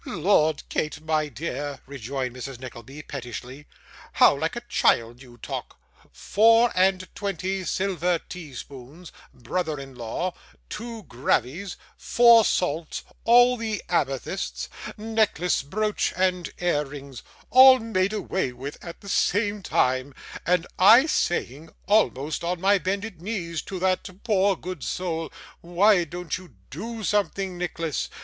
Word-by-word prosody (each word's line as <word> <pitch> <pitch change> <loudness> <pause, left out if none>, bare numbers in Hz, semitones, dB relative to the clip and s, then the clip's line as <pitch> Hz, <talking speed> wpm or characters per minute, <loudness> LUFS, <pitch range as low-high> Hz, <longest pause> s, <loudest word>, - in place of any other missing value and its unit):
'Lord, 165 - +2
Kate, 150 -1 -2
my 155 -1 0
dear,' 145 +1 -5
rejoined 130 -1 -5
Mrs. 130 +1 -7
Nickleby, 130 +3 -9
pettishly, 130 +2 -8 0.5
'how - - +6
like - - -2
a - - -4
child 115 +2 +1
you 120 -3 -14
talk! - - -6 0.3
Four 230 +2 +4
and 185 0 +2
twenty 190 -1 -3
silver 180 -1 0
tea 160 -5 -10
spoons, 140 +7 -10 0.2
brother 155 +4 -3
in 135 -1 -9
law, 125 +9 -3 0.4
two 225 0 -6
gravies, 145 +7 -1 0.2
four 235 -1 +6
salts, 165 -5 -1 0.2
all 245 +2 +6
the 220 -2 -3
amethysts 130 - -2 0.3
necklace, 215 -6 +1
brooch, 210 +9 -1
and 185 -1 +1
ear 175 -4 +1
rings 140 -2 -9 0.3
all 260 +1 +9
made 210 -5 0
away 190 -8 -2
with, 135 +4 -8
at 170 - -9
the 200 - -12
same 205 +1 +1
time, 130 -4 0 0.3
and 180 -1 +2
I 225 +8 +8
saying, 160 - -1 0.2
almost 160 -9 +1
on 175 +1 -1
my 195 +2 +3
bended 195 -1 -3
knees, 175 -5 -3
to 190 - -4
that 185 +1 0
poor 200 -4 +2
good 180 -3 -7
soul, 165 -3 -3 0.3
"Why 175 +2 +3
don't 175 +2 -5
you 180 - -16 0.2
do 225 - -6
something, 195 -1 0
Nicholas? 165 -3 -3
175 Hz, 130 wpm, -25 LUFS, 140-200 Hz, 0.5 s, all